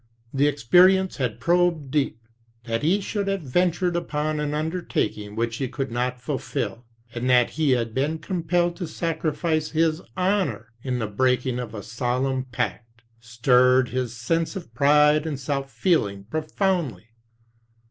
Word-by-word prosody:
The 140 Hz, +1 st, +3 dB
experience 180 Hz, +8 st, +4 dB
had 125 Hz, -5 st, -2 dB
probed 170 Hz, -2 st, +1 dB
deep. 140 Hz, -6 st, 0 dB, 0.5 s
That 115 Hz, -1 st, -2 dB
he 180 Hz, +7 st, +2 dB
should 200 Hz, 0 st, -3 dB
have 195 Hz, -3 st, -1 dB
ventured 175 Hz, +5 st, +1 dB
upon 155 Hz, -2 st, -1 dB
an 150 Hz, 0 st, -1 dB
undertaking 155 Hz, -, -2 dB
which 115 Hz, 0 st, -1 dB
he 135 Hz, -, -2 dB
could 135 Hz, 0 st, -4 dB
not 125 Hz, +1 st, -1 dB
fulfill, 125 Hz, -2 st, -4 dB, 0.3 s
and 125 Hz, +2 st, -2 dB
that 125 Hz, -1 st, +4 dB
he 150 Hz, -4 st, +2 dB
had 115 Hz, -3 st, -1 dB
been 145 Hz, +5 st, 0 dB
compelled 175 Hz, +1 st, 0 dB
to 175 Hz, -, -4 dB
sacrifice 155 Hz, -1 st, -1 dB
his 160 Hz, +1 st, +1 dB, 0.2 s
honor 180 Hz, -, 0 dB
in 125 Hz, -1 st, -2 dB
the 115 Hz, -, -1 dB
breaking 125 Hz, +3 st, 0 dB
of 115 Hz, -3 st, -6 dB
a 100 Hz, -, -6 dB
solemn 125 Hz, +3 st, -1 dB
pact, 115 Hz, -2 st, -4 dB, 0.2 s
stirred 125 Hz, +2 st, +3 dB
his 125 Hz, -1 st, -3 dB
sense 165 Hz, -, -1 dB
of 175 Hz, -11 st, -8 dB
pride 150 Hz, +4 st, +4 dB
and 145 Hz, -4 st, -3 dB
self 135 Hz, 0 st, -3 dB
feeling 110 Hz, -, +1 dB
profoundly. 155 Hz, -, -2 dB
140 Hz, 145 wpm, -24 LUFS, 120-165 Hz, 0.5 s, experience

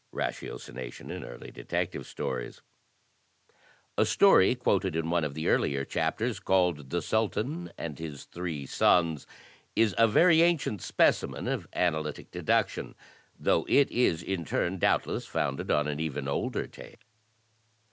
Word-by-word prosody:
Ratiocination 60 Hz, -2 st, -5 dB
in -, -, -6 dB
Early -, -, -9 dB
Detective -, -, -3 dB
Stories 60 Hz, -2 st, -5 dB, 1.4 s
A -, -, +6 dB
story 95 Hz, +7 st, +5 dB
quoted 95 Hz, -7 st, 0 dB
in 80 Hz, 0 st, -1 dB
one 85 Hz, -1 st, +2 dB
of 75 Hz, -2 st, -3 dB
the 80 Hz, -, -3 dB
earlier 70 Hz, -1 st, +1 dB
chapters, 115 Hz, -, -1 dB
called 90 Hz, -8 st, +1 dB
"The 85 Hz, +3 st, -1 dB
Sultan 110 Hz, -, -1 dB
and 80 Hz, -3 st, -6 dB
his 75 Hz, -4 st, -7 dB
Three 85 Hz, -5 st, -5 dB
Sons," 80 Hz, +1 st, +2 dB, 0.5 s
is 110 Hz, -3 st, +3 dB
a 115 Hz, -, +7 dB
very 165 Hz, +8 st, +5 dB
ancient 165 Hz, -, +2 dB
specimen -, -, +1 dB
of -, -, -2 dB
analytic 80 Hz, -4 st, -1 dB
deduction. -, -, 0 dB, 0.4 s
Though -, -, +2 dB
it 140 Hz, -1 st, +4 dB
is, 85 Hz, -10 st, +2 dB
in 95 Hz, -3 st, -2 dB
turn, 85 Hz, +3 st, -1 dB
doubtless -, -, +1 dB
founded 70 Hz, 0 st, -2 dB
on 75 Hz, 0 st, +2 dB
an 75 Hz, 0 st, -3 dB
even 75 Hz, -3 st, -3 dB
older 70 Hz, -, -1 dB
tale. -, -, -13 dB
85 Hz, 135 wpm, -29 LUFS, 75-105 Hz, 1.4 s, a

